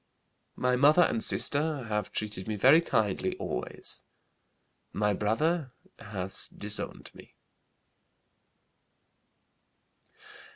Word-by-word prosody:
My 125 0 +1
mother 150 +7 +6
and 115 -8 0
sister 145 -1 +1
have 105 -2 -3
treated 105 -3 -5
me 110 - -2
very 135 +10 +6
kindly 110 - 0
always. - - -4 0.9
My 105 0 +1
brother 130 - 0 0.3
has 95 -2 -2
disowned 105 +1 -4
me." - - -16
110 Hz, 85 wpm, -29 LUFS, 105-145 Hz, 0.9 s, mother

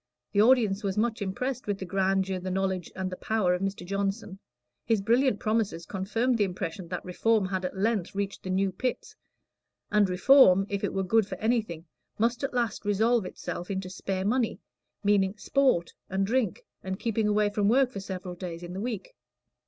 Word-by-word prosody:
The 205 - +3
audience 220 -4 +4
was 195 -1 -2
much 225 0 0
impressed 250 +6 -3
with 205 -1 -1
the 190 - -6
grandeur, 190 0 0
the 185 +1 -5
knowledge, 190 -1 -1
and 185 0 -3
the - - -4
power 215 -5 +1
of 180 - -2
Mr. 195 -2 -3
Johnson. 195 +1 -3 0.4
His 225 -2 +2
brilliant 235 +2 +2
promises 215 -6 -1
confirmed 225 +6 0
the - - +5
impression 180 -1 -4
that 180 - -5
Reform 210 +3 +1
had 185 -1 -2
at 180 - -4
length 200 -2 0
reached 200 0 -3
the 185 - -7
New 190 +1 +1
Pits; 250 +7 -3 0.8
and 210 -2 +4
Reform, 195 0 +6
if 200 -1 -3
it - - -1
were 195 - +1
good 220 +2 +3
for - - -5
anything, 215 -8 -1 0.3
must 235 +4 +1
at 275 - -1
last 240 -4 -1
resolve 215 +1 +2
itself 175 0 -6
into 190 -2 -3
spare 190 0 -3
money 235 +2 +1 0.4
meaning 200 -1 +2
"sport" 255 -8 +1 0.2
and 190 +1 0
drink, 230 -3 0 0.2
and 190 0 -4
keeping 225 -2 0
away 210 0 +2
from 205 -1 +1
work 255 +2 +4
for 200 - -5
several 185 -2 -6
days 175 -1 -7
in 175 0 -7
the 190 - -4
week. 220 -4 -4
200 Hz, 190 wpm, -28 LUFS, 190-225 Hz, 0.8 s, Reform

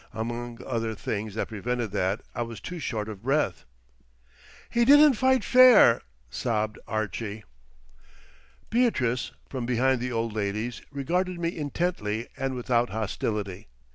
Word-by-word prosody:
Among 120 +1 -4
other 115 -3 -2
things 105 0 -4
that - - -2
prevented 115 +1 -3
that, 95 +4 0
I - - -3
was 115 -2 -5
too 180 -1 -7
short 110 -7 -3
of 105 -3 -8
breath. 140 +6 0 1.0
"He 235 - +2
didn't 290 +3 +7
fight 260 0 +2
fair," 250 - +7 0.3
sobbed 110 - -2
Archie. 110 0 -3 1.3
Beatrice, 135 - +1 0.2
from 125 -3 -4
behind 125 +1 +2
the 125 0 -2
old 115 -1 -2
ladies, 110 +3 -3
regarded 175 +6 -1
me 170 0 -2
intently 145 -8 -2
and 135 -1 -2
without 120 -1 +1
hostility. 105 -2 -3
120 Hz, 130 wpm, -27 LUFS, 110-145 Hz, 1.3 s, didn't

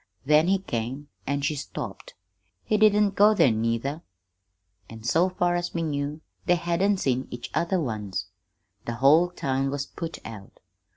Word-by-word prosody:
Then 150 +3 +5
he 195 +1 +4
came, 135 -4 -4 0.2
an' 140 +1 0
she 150 - 0
stopped. 140 -6 -7 0.5
He 215 - 0
didn't 210 -1 +4
go 210 +2 +5
there, 135 - +5
neither, 115 +7 -1 0.9
an', 110 -1 -10
so 165 +10 +3
far 175 -1 0
as 175 0 -2
we 165 - 0
knew, 145 0 -3 0.3
they 180 - +5
hadn't 175 +4 +1
seen 130 -6 0
each 120 0 -7
other 180 +2 +1
once. 105 - -3 0.6
The 120 - -3
whole 150 +8 +5
town 135 -5 -1
was 140 0 -2
put 165 +2 -6
out. 105 -3 -10
145 Hz, 160 wpm, -26 LUFS, 125-175 Hz, 0.9 s, Then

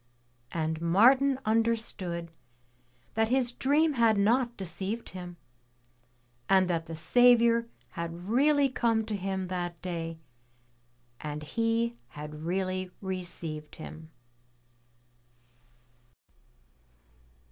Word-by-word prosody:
And 160 -1 -2
Martin 255 +11 +5
understood 215 -7 0 0.8
that 225 0 +2
his 250 0 +2
dream 295 +5 +2
had 230 -4 +3
not 235 +4 +2
deceived 190 +5 -4
him, 180 -2 -8 1.1
and 190 -1 +5
that 165 -2 -1
the 165 - -6
Saviour 235 +6 +4 0.2
had 170 +2 -6
really 285 +5 +4
come 230 -4 +1
to 215 -1 -3
him 190 -1 -2
that 175 -2 -3
day 165 -2 -4 1.0
and 150 0 -5
he 230 +6 0
had 150 +1 -8
really 185 0 -1
received 170 -5 -4
Him. 160 0 -10
190 Hz, 90 wpm, -29 LUFS, 170-235 Hz, 1.1 s, Martin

